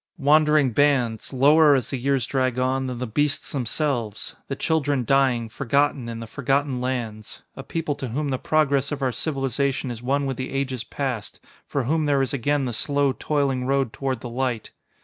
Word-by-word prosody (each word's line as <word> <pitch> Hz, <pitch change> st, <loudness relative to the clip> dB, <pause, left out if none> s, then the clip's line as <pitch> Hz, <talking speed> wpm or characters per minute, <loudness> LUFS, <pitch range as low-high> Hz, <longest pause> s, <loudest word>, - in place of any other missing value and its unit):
wandering 150 Hz, -1 st, +4 dB
bands, 125 Hz, -4 st, +1 dB
lower, 145 Hz, +3 st, +6 dB
as 125 Hz, -3 st, -2 dB
the 135 Hz, -, -1 dB
years 135 Hz, -1 st, +1 dB
drag 130 Hz, -2 st, 0 dB
on, 130 Hz, +1 st, 0 dB
than 125 Hz, -1 st, -4 dB
the 125 Hz, -, -3 dB
beasts 145 Hz, +5 st, -1 dB
themselves; 125 Hz, -4 st, -2 dB
the 135 Hz, -, -3 dB
children 145 Hz, -4 st, 0 dB
dying, 130 Hz, -3 st, +2 dB
forgotten, 135 Hz, +2 st, 0 dB
in 115 Hz, -1 st, -5 dB
the 115 Hz, -, -6 dB
forgotten 135 Hz, +2 st, -1 dB
lands; 115 Hz, -4 st, -4 dB
a -, -, -6 dB
people 165 Hz, -3 st, -2 dB
to 135 Hz, -, -5 dB
whom 140 Hz, +5 st, -2 dB
the 130 Hz, -2 st, -1 dB
progress 140 Hz, -3 st, +1 dB
of 145 Hz, -1 st, -3 dB
our 130 Hz, -, +2 dB
civilization 135 Hz, 0 st, -1 dB
is 115 Hz, -1 st, -7 dB
one 140 Hz, +3 st, 0 dB
with 135 Hz, -2 st, -3 dB
the 130 Hz, -, -4 dB
ages 130 Hz, -3 st, -2 dB
past, 125 Hz, -6 st, -4 dB, 0.3 s
for 140 Hz, -, -1 dB
whom 155 Hz, +4 st, +1 dB
there 140 Hz, -2 st, +3 dB
is 135 Hz, -, -2 dB
again 140 Hz, +1 st, 0 dB
the 120 Hz, -, -3 dB
slow, 140 Hz, +3 st, +1 dB
toiling 135 Hz, -3 st, 0 dB
road 135 Hz, -3 st, +1 dB
toward 130 Hz, -3 st, -3 dB
the -, -, -5 dB
light. 125 Hz, -2 st, -2 dB
135 Hz, 190 wpm, -24 LUFS, 125-145 Hz, 0.3 s, lower